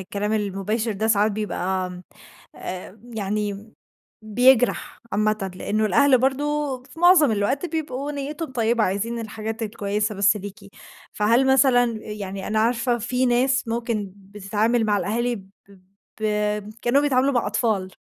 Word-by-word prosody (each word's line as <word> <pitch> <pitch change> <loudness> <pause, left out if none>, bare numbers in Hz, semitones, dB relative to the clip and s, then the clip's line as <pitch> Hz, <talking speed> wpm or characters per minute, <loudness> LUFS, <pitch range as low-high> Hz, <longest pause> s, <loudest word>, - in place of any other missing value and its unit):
الكلام 205 +3 -3
المباشر 210 +2 -1
ده 215 +2 -2
ساعات 210 -1 +3
بيبقى، 190 -3 -2
آمم، 180 0 -9 0.5
آآ، 185 +3 -7 0.2
يعني 210 +1 -3 0.5
بيجرح 245 +3 +2
عامةً، 210 -1 0
لأنه 215 +3 -1
الأهل 260 +6 +4
برضه 275 0 -1
في 325 - -14
معظم 345 -8 +6
الوقت 250 - 0
بيبقوا 295 -4 -4
نيتهم 290 +1 -5
طيبة، 230 -1 +1
عايزين 210 +5 -2
الحاجات 220 +1 -5
الكويسة 210 0 -2
بس 205 +2 +3
ليكِ. 200 0 -8 0.5
فهل 230 +5 +3
مثلًا 260 -2 +5 0.2
يعني 200 -3 -6
أنا 215 0 0
عارفة 240 +1 +1
في 250 +3 0
ناس 255 +1 +2
ممكن 225 -4 -2
بتتعامل 210 +4 -1
مع 210 -1 +2
الأهالي 235 +6 -1
ب 190 -1 -14 0.7
ب - - -3 0.6
كأنهم 270 +4 +3
بيتعاملوا 275 -1 +2
مع 240 -4 +1
أطفال، 210 -3 0
220 Hz, 135 wpm, -23 LUFS, 205-255 Hz, 0.7 s, معظم